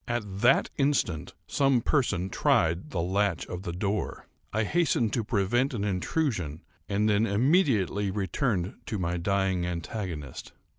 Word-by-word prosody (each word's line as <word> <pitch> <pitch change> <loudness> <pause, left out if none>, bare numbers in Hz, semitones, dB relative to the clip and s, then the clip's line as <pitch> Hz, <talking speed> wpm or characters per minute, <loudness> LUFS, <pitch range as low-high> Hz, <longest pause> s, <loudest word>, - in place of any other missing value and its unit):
At 105 -5 -3
that 125 +3 +4
instant 135 - 0
some 135 -3 +2
person 95 - 0
tried 85 +3 +2
the 85 -3 -2
latch 95 -1 0
of 90 - -6
the 85 - -4
door. 100 +4 -2 0.3
I 110 +1 +1
hastened 120 -4 +1
to 115 - 0
prevent 120 +5 +1
an 100 - -2
intrusion, 95 - -1 0.3
and 105 +1 +1
then 105 +1 +3
immediately 105 - +2
returned 95 - -1
to 110 - -2
my 90 -1 -1
dying 95 0 0
antagonist. 85 - -5
100 Hz, 140 wpm, -28 LUFS, 90-120 Hz, 0.3 s, that